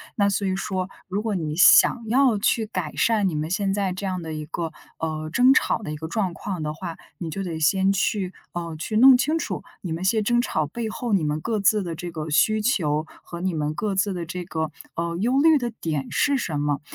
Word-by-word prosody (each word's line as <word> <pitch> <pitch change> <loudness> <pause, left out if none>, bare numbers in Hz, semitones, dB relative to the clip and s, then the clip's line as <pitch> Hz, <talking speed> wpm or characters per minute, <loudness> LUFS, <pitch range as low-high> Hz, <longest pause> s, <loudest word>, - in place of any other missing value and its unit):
那 200 -1 +3
所 200 0 0
以 185 - 0
说 190 -1 -3 0.2
如 200 +3 -1
果 215 -3 -2
你 155 -2 -3
想 230 +5 +6
要 250 -2 +3
去 220 +1 +1
改 185 -8 -4
善 215 -4 +2
你 165 - -2
们 155 +2 -2
现 195 0 0
在 195 -2 0
这 185 +2 -5
样 185 -2 -2
的 160 -1 -6
一 155 -1 -5
个， 165 +1 -4 0.3
呃， 155 -1 -3
争 255 +5 +5
吵 - - +2
的 155 -8 -6
一 150 - -4
个 160 +1 -6
状 185 -1 -1
况 180 -4 -5
的 150 0 -2
话， 170 0 -7 0.2
你 170 -2 -5
就 195 +4 -4
得 165 -3 -4
先 190 +5 +3
去， 195 -1 0 0.2
呃， 170 -2 -4
去 215 +7 -4
弄 255 +2 +8
清 305 +6 +1
楚， - - -3 0.2
你 175 - -5
们 165 +2 -3
些 215 +3 +3
争 240 +3 +2
吵 155 -10 -1
背 225 +9 -4
后 240 -1 -4
你 180 -6 +2
们 150 +1 -1
各 225 -2 -1
自 205 0 +3
的 170 -2 -4
这 175 +1 -6
个 155 -1 -5
需 185 +8 +3
求 155 - +1 0.2
和 170 0 -8
你 185 -1 -1
们 150 0 -1
各 205 +2 -2
自 195 0 +1
的 175 -2 -4
这 180 +1 -5
个， 160 -3 -3 0.2
呃， 170 0 -2
忧 245 +7 +2
虑 320 -1 +6
的 240 -3 -2
点 150 -5 -2
是 285 -2 +2
什 155 - -2
么。 145 -1 -1
185 Hz, 260 characters per minute, -24 LUFS, 160-215 Hz, 0.3 s, 弄